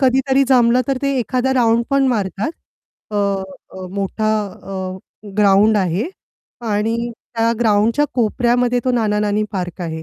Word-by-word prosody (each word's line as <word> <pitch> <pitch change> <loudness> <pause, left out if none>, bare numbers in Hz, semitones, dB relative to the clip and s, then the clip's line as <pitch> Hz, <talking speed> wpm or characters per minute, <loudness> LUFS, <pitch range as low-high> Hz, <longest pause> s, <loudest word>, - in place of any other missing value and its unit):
कधीतरी 265 +1 +3
जमलं 245 -1 +4
तर 270 - +1
ते 275 0 +1
एखादा 255 +3 0
राउंड 235 -2 +3
पण 275 -1 +3
मारतात. 205 - -1 0.6
अ, 210 - -3 0.5
अ, 185 0 -8
मोठा 200 +3 -1 0.3
अ, 190 -1 -5 0.4
ग्राऊंड 210 +1 +5
आहे 190 - 0 0.6
आणि 215 +2 0 0.4
त्या 230 0 +2
ग्राऊंडच्या 225 +4 +3
कोपऱ्यामध्ये 245 +1 +1
तो 255 - +2
नाना-नानी 210 -2 +1
पार्क 180 -3 -4
आहे. 160 -1 -5
225 Hz, 130 wpm, -19 LUFS, 200-250 Hz, 0.6 s, ग्राऊंड